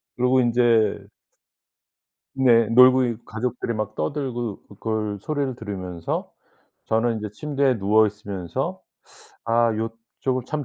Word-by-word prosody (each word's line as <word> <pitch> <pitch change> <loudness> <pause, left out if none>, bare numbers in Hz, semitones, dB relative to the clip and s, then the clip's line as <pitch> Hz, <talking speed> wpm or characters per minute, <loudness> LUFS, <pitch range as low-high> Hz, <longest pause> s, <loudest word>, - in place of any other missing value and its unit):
그러고 125 +1 +3
인제 120 -3 +2 1.3
네. 120 -4 +4
놀고 125 -1 +5
가족들이 120 +1 -3
막 110 0 -4
떠들고 120 -7 -3
그걸 105 0 -3
소리를 140 -2 -2
들으면서 95 -6 -5 0.5
저는 115 +1 +1
인제 105 -1 -5
침대에 140 +1 0
누워 105 +3 +4
있으면서 100 -5 -5 0.6
'아 115 0 +3
요쪽은 115 +3 -4
참 150 -1 -3
115 Hz, 240 characters per minute, -23 LUFS, 105-125 Hz, 1.3 s, 놀고